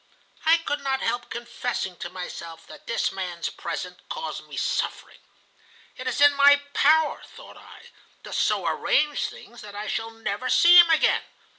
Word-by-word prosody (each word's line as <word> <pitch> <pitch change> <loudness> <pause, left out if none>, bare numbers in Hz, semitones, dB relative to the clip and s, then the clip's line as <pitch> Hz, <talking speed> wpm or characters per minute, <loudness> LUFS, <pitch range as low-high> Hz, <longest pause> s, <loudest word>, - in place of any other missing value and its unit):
I 325 +1 +6
could 295 -3 -3
not 270 -1 -1
help 240 +1 -2
confessing 235 -5 -4
to 175 - -6
myself 170 -2 -8
that - - -14
this 230 - 0
man's 180 -3 -4
presence 180 +2 -6
caused 485 -1 -5
me - - -10
suffering. - - -3 0.8
'It 255 - -7
is - - -2
in 290 0 +7
my 285 0 +6
power,' 310 +1 +3
thought - - -14
I, - - -15 0.3
'to - - -9
so - - 0
arrange 295 -1 +1
things 240 - -13
that 205 -1 -11
I 205 +1 -5
shall 225 +2 -3
never 225 +2 -4
see 345 +1 +6
him 345 -1 +9
again. 320 -1 +3
240 Hz, 165 wpm, -24 LUFS, 195-290 Hz, 0.8 s, him